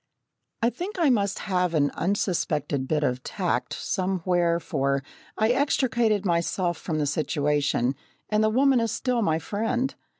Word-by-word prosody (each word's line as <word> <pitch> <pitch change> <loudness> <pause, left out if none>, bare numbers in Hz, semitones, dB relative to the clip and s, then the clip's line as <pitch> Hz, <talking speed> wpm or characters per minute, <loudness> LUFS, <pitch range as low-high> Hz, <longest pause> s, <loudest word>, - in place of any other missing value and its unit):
I 235 - +4
think 365 - -6
I 325 -6 +4
must 200 -4 +1
have 180 -3 0
an 145 -2 +2
unsuspected 165 -8 -1
bit 150 0 0
of 125 -2 0
tact 180 +5 -2
somewhere 180 -3 0
for 140 -4 -1 0.3
I 220 +1 +2
extricated 240 -6 +2
myself 175 0 0
from 160 -3 -3
the 150 - +1
situation, 145 -3 0 0.3
and 215 0 +2
the 215 - +4
woman 265 +3 +4
is 230 -2 0
still 245 +2 0
my 160 -6 +2
friend. 225 - -1
185 Hz, 145 wpm, -26 LUFS, 155-225 Hz, 0.3 s, I